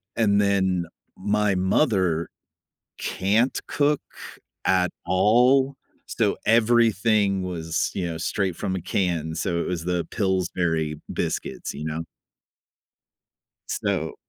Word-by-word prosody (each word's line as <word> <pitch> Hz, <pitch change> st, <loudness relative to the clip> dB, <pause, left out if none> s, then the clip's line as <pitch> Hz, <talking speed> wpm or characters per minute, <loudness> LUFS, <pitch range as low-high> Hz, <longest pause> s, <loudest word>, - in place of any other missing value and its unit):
And 105 Hz, -3 st, +3 dB
then 95 Hz, -3 st, +2 dB, 0.3 s
my 105 Hz, 0 st, +1 dB
mother 95 Hz, -, +1 dB, 0.7 s
can't 105 Hz, +7 st, +1 dB
cook 145 Hz, 0 st, +2 dB, 0.6 s
at 90 Hz, -1 st, +3 dB, 0.2 s
all, 125 Hz, +8 st, +4 dB, 0.3 s
so 105 Hz, -3 st, 0 dB
everything 110 Hz, -3 st, +3 dB
was, 85 Hz, -3 st, -2 dB
you 90 Hz, -3 st, -2 dB
know, 80 Hz, -, -5 dB
straight 95 Hz, 0 st, -1 dB
from 95 Hz, -, -2 dB
a -, -, -3 dB
can. 85 Hz, -3 st, -1 dB
So, 85 Hz, 0 st, -1 dB
it -, -, -2 dB
was 85 Hz, -2 st, -3 dB
the 90 Hz, -1 st, -1 dB
Pillsbury 85 Hz, -5 st, 0 dB
biscuits, -, -, -3 dB
you 75 Hz, -, -6 dB
know. 80 Hz, +1 st, -3 dB, 1.7 s
So -, -, -2 dB
95 Hz, 110 wpm, -24 LUFS, 85-105 Hz, 1.7 s, all